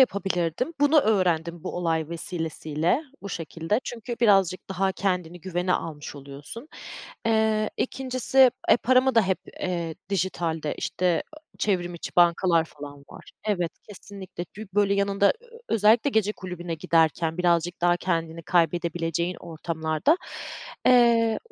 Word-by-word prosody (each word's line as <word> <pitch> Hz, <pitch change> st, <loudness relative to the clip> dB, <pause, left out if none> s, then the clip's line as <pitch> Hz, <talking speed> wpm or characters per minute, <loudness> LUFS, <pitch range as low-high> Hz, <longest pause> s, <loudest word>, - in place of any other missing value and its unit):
yapabilirdim. 195 Hz, -, +1 dB
Bunu 290 Hz, +2 st, +5 dB
öğrendim 175 Hz, -, +1 dB
bu -, -, -4 dB
olay 165 Hz, -3 st, 0 dB
vesilesiyle, 165 Hz, -, -2 dB, 0.2 s
bu 200 Hz, -, -6 dB
şekilde. 165 Hz, -, -2 dB
Çünkü 240 Hz, 0 st, -6 dB
birazcık 195 Hz, -5 st, +3 dB
daha 190 Hz, 0 st, 0 dB
kendini 180 Hz, -3 st, -2 dB
güvene 180 Hz, +1 st, -1 dB
almış 150 Hz, -3 st, -4 dB
oluyorsun. 145 Hz, -, -10 dB, 0.6 s
Eee, 220 Hz, -1 st, +2 dB
2'ncisi 260 Hz, 0 st, +3 dB, 0.2 s
e, -, -, +7 dB
paramı 255 Hz, +1 st, +3 dB
da, 225 Hz, -, +6 dB
hep, 190 Hz, -1 st, 0 dB, 0.2 s
eee, 170 Hz, -3 st, -2 dB
dijitalde, 170 Hz, -5 st, -1 dB
işte, 185 Hz, -, -3 dB, 0.3 s
ııı, 305 Hz, -, -14 dB, 0.2 s
çevrim 175 Hz, -4 st, 0 dB
içi 170 Hz, -, -8 dB
bankalar 170 Hz, -1 st, +4 dB
falan 145 Hz, -2 st, -11 dB
var -, -, -13 dB
Evet, 180 Hz, -6 st, 0 dB, 0.2 s
kesinlikle. 195 Hz, -3 st, -8 dB
Bir, 215 Hz, -1 st, -8 dB
böyle, 200 Hz, -1 st, +3 dB
yanında 200 Hz, 0 st, +3 dB
ö 485 Hz, -, -20 dB
ö 465 Hz, -, -13 dB
özellikle 225 Hz, -, +4 dB
gece 215 Hz, -3 st, +1 dB
kulübüne 180 Hz, -3 st, -6 dB
giderken 160 Hz, +1 st, +1 dB
birazcık 175 Hz, 0 st, +1 dB
daha 175 Hz, 0 st, +3 dB
kendini 165 Hz, -2 st, -2 dB
kaybedebileceğin 170 Hz, 0 st, 0 dB
ortamlarda, 160 Hz, -, 0 dB, 0.7 s
eee, 235 Hz, -3 st, +5 dB
180 Hz, 130 wpm, -25 LUFS, 165-215 Hz, 0.7 s, e